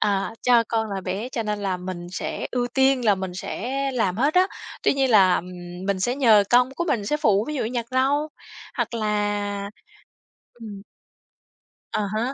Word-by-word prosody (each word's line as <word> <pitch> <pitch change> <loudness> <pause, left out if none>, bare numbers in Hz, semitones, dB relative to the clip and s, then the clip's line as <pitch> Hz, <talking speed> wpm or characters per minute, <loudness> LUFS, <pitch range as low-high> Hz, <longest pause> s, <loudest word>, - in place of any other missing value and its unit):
à, 200 +2 0
cho 240 -2 +5
con 220 -2 -1
là 195 - -3
bé 190 +6 -4
cho 235 -3 -3
nên 210 -1 -2
là 195 -2 -1
mình 180 -1 -6
sẽ - - -4
ưu 245 -1 0
tiên 265 -2 +3
là 205 -2 +5
mình 190 -1 -5
sẽ 230 +5 -5 0.2
làm 205 -7 0
hết 285 +7 +1
á. 365 +1 +5 0.4
Tuy - - +4
nhiên 270 -2 +1
là, 190 -4 +6
ừm, 180 +1 -7
mình 195 -2 0
sẽ 245 +6 +1
nhờ 220 -7 +5
con 250 +2 +5
của 345 - -1
mình 230 -11 0
sẽ 300 - +1
phụ, 215 -8 +2
ví 300 - -3
dụ 260 - -1
nhặt 235 0 -3
rau, 280 +4 +1 0.5
hoặc - - -2
là 205 -2 -1 0.8
ừm. 215 -4 -9 1.1
À 215 - 0
há, 240 +5 -1
215 Hz, 190 wpm, -24 LUFS, 195-250 Hz, 1.1 s, là